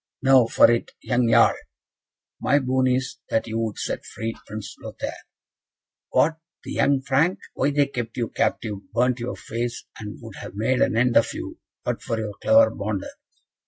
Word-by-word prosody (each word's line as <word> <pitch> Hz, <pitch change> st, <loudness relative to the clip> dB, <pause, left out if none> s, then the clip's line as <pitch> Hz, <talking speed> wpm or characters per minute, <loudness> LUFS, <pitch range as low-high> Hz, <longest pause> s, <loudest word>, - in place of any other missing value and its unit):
Now 130 Hz, -3 st, +6 dB
for 115 Hz, -, +6 dB
it, 115 Hz, -, 0 dB
young 120 Hz, -1 st, +1 dB
Jarl." -, -, +6 dB, 0.9 s
"My 140 Hz, -, +3 dB
boon 130 Hz, -1 st, +1 dB
is, 130 Hz, 0 st, -1 dB
that 110 Hz, -, +1 dB
you 115 Hz, 0 st, -3 dB
would 110 Hz, -2 st, -2 dB
set -, -, -3 dB
free 115 Hz, +1 st, -5 dB
Prince 105 Hz, -1 st, -7 dB
Lothaire." -, -, -6 dB, 0.8 s
"What? 160 Hz, +1 st, +2 dB, 0.2 s
the -, -, -7 dB
young 140 Hz, -1 st, +2 dB
Frank? 150 Hz, +8 st, +2 dB, 0.2 s
Why -, -, +1 dB
they 145 Hz, 0 st, +3 dB
kept 120 Hz, -4 st, -5 dB
you 115 Hz, -2 st, -1 dB
captive, 105 Hz, -3 st, -1 dB, 0.2 s
burnt 125 Hz, +1 st, +2 dB
your 120 Hz, -, -4 dB
face, 115 Hz, +1 st, -4 dB, 0.2 s
and 105 Hz, -1 st, -7 dB
would -, -, -10 dB
have 90 Hz, -, -9 dB
made 120 Hz, +5 st, +1 dB
an 110 Hz, -, +2 dB
end 125 Hz, 0 st, +4 dB
of -, -, +3 dB
you -, -, -7 dB, 0.3 s
but -, -, -2 dB
for 115 Hz, -, -2 dB
your 110 Hz, -2 st, -3 dB
clever 280 Hz, 0 st, +6 dB
Bonder." 100 Hz, -1 st, -4 dB
120 Hz, 175 wpm, -24 LUFS, 110-130 Hz, 0.9 s, Now